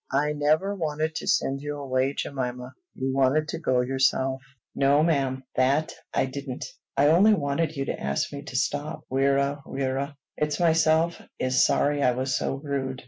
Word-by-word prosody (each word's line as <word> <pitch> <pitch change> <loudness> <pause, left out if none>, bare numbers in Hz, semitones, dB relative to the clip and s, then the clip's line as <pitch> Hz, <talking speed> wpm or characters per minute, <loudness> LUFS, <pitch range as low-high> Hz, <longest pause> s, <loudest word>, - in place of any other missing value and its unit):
"I 145 +3 +1
never 155 +7 +1
wanted 155 -3 -2
to - - -6
send 135 0 +1
you 145 0 -4
away, 135 0 0
Jemima. 125 -2 -4 0.2
You 130 0 -2
wanted 135 +4 +2
to 165 - -3
go 130 -6 +2
yourself." 130 +1 +1 0.3
"No, 140 +2 +3
ma'am; 135 -5 0
that 140 +5 +2 0.2
I - - +1
didn't. 135 -1 -6 0.3
I 145 +2 +5
only 200 +7 +6
wanted 155 0 -1
you 135 -1 -2
to - - -4
ask 70 - -1
me 140 - -5
to 130 - -8
stop. 145 +4 -2
Wirra! 140 +1 +1
wirra! 135 +2 -3 0.2
It's 150 +2 -1
myself 165 0 +3 0.2
is 130 0 +2
sorry 145 0 +2
I 125 -2 +3
was 130 +1 -1
so - - -1
rude. 135 -2 -3
140 Hz, 170 wpm, -26 LUFS, 130-150 Hz, 0.3 s, only